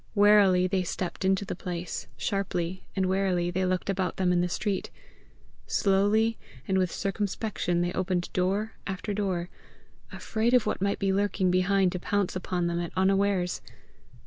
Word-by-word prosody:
Warily 200 -3 +6
they 185 0 +1
stepped 180 +1 -4
into 190 +1 +2
the - - -4
place, 175 -1 -5
sharply 185 -2 -2
and 190 -1 +1
warily 185 -2 +1
they 185 +1 0
looked 185 0 -1
about 190 -2 -1
them 185 -2 +2
in 175 -1 +3
the 180 - 0
street, 200 +2 -2 0.8
slowly 205 +3 +2 0.3
and 190 -1 +2
with 185 -2 +1
circumspection 195 -3 -1
they 175 0 -1
opened 180 -1 -1
door 195 +4 0
after 195 +2 -3
door, 190 -4 -1 0.6
afraid 230 +3 0
of 245 - +4
what 210 - -2
might 200 0 +1
be 195 -1 +1
lurking 195 -2 +1
behind 185 +1 +3
to 180 - -4
pounce 200 0 -1
upon 180 -1 -2
them 170 0 -1
at 170 -1 -3
unawares. 190 -1 +2
190 Hz, 160 wpm, -28 LUFS, 180-200 Hz, 0.8 s, Warily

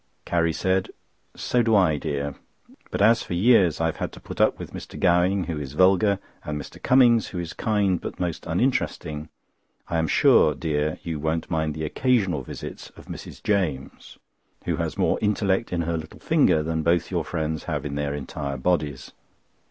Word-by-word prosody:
Carrie 85 -1 +1
said: 95 +3 0 0.5
"So 125 - +1
do 115 -1 +3
I, 90 -7 +4
dear; 70 -2 -3 0.6
but 90 +2 0
as 115 +2 +5
for 85 - -4
years 95 -4 +4
I 80 - +1
have 80 - -1
had - - -3
to - - -11
put - - -5
up - - +3
with - - -9
Mr. - - -8
Gowing, 90 +2 +3
who 85 -3 -4
is 70 -2 -6
vulgar, 95 +4 +4 0.3
and 75 -1 -4
Mr. 70 - -10
Cummings, 120 -4 +5
who 90 - -7
is 85 -2 -4
kind 100 -5 +1
but - - -7
most 85 -3 -3
uninteresting, 80 - -1 0.6
I 85 - 0
am 80 - +1
sure, - - +5
dear, 75 -1 -1
you 80 -3 -4
won't 80 +3 -2
mind 80 -2 0
the 80 0 -3
occasional 100 - +1
visits 65 - -8
of - - -13
Mrs. - - -9
James, 90 -11 -2 0.5
who - - -1
has - - -3
more - - +1
intellect 105 0 +1
in 90 -1 0
her 85 0 -1
little 80 - -10
finger 75 - +3
than 80 0 -1
both 85 +2 +1
your 85 -3 0
friends 80 -2 -3
have 75 -4 -3
in 70 - -4
their 70 0 -2
entire 70 0 -5
bodies." 75 -3 -1
85 Hz, 185 wpm, -24 LUFS, 75-95 Hz, 0.6 s, as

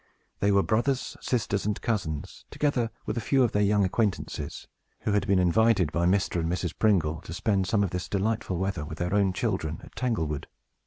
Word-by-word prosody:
They 100 - +3
were 100 0 +4
brothers, 125 +4 0
sisters, 105 -5 0
and 105 - -1
cousins, 85 -10 -3
together 130 -6 0 0.2
with 110 +2 -2
a - - -4
few 135 +4 +3
of 120 - +2
their 105 - +1
young 105 0 +3
acquaintances, 95 -7 -2 0.3
who 105 - -1
had 100 0 +1
been 100 - +4
invited 90 -1 +3
by 85 +1 +1
Mr. 95 -1 +1
and 80 0 -1
Mrs. 90 -2 -2
Pringle 85 -8 +2
to 80 - -8
spend 95 -1 +1
some 100 0 +2
of 95 - -1
this 90 0 -4
delightful 100 -2 -1
weather 95 -3 -2
with 75 +1 -7
their 90 +3 -2
own 100 -2 +3
children 95 - -2
at - - -14
Tanglewood. 80 - -1
100 Hz, 200 wpm, -27 LUFS, 90-110 Hz, 0.3 s, were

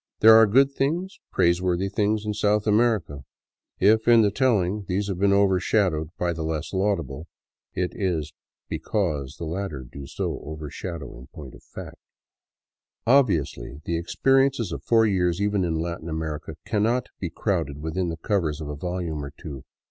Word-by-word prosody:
There 110 +1 +9
are 110 0 +8
good 135 +6 +4
things, 165 +8 -2
praiseworthy 90 +2 +2
things 105 +1 0
in 105 - -1
South 105 0 +1
America; 105 -9 +2 0.6
if, 110 +4 +4
in 115 -1 +7
the 100 - +2
telling, 105 -5 +1
these 100 +2 -1
have 95 -2 -3
been 100 0 +3
over 100 -2 +4
shadowed 90 -6 +1
by 90 -1 0
the 80 - -6
less 80 +1 -3
laudable, 85 -6 -1 0.5
it 90 -1 -1
is 85 -7 -2 0.3
because 75 -9 -2
the 85 - -5
latter 80 -5 -4
do 70 +3 -10
so - - -3
overshadow 75 -1 -7
in 65 - -13
point - - -11
of - - -14
fact. - - -10 1.1
Obviously, 80 - +2
the 85 - -1
experiences 135 +3 +2
of - - -5
four 115 -1 +4
years, 90 -4 +1
even 100 -1 +1
in 85 -2 -1
Latin 85 0 -4
America, 80 -1 -4
cannot 110 +3 0
be 90 - -3
crowded 80 -6 -2
within 80 +4 -2
the 80 - -4
covers 80 -4 -1
of 75 -2 -6
a 75 - -4
volume 85 -2 -3
or 70 - -5
two. 70 -4 -8
90 Hz, 165 wpm, -25 LUFS, 80-105 Hz, 1.1 s, There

